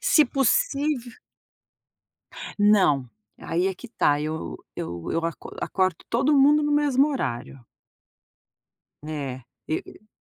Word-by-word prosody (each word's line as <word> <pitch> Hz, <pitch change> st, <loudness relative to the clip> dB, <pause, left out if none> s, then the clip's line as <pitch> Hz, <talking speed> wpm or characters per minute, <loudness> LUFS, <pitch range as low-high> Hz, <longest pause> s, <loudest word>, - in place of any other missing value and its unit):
se 305 Hz, -, +5 dB
possív 275 Hz, -, 0 dB, 1.4 s
Não, 190 Hz, -11 st, +4 dB, 0.3 s
aí 175 Hz, +3 st, 0 dB
é 190 Hz, -, -3 dB
que 250 Hz, -, -11 dB
está, 145 Hz, -10 st, +1 dB
eu 150 Hz, -, -4 dB, 0.2 s
eu 85 Hz, -1 st, -5 dB
eu 165 Hz, 0 st, -1 dB
acor 165 Hz, -, -5 dB
acordo 185 Hz, -3 st, 0 dB
todo 270 Hz, +5 st, +3 dB
mundo 290 Hz, +2 st, +6 dB
no 295 Hz, 0 st, 0 dB
mesmo 290 Hz, -1 st, +3 dB
horário. 130 Hz, -, -4 dB, 1.4 s
É, 140 Hz, -5 st, -5 dB, 0.3 s
e 155 Hz, -, 0 dB
e 215 Hz, -, -16 dB
205 Hz, 115 wpm, -25 LUFS, -, 1.4 s, mundo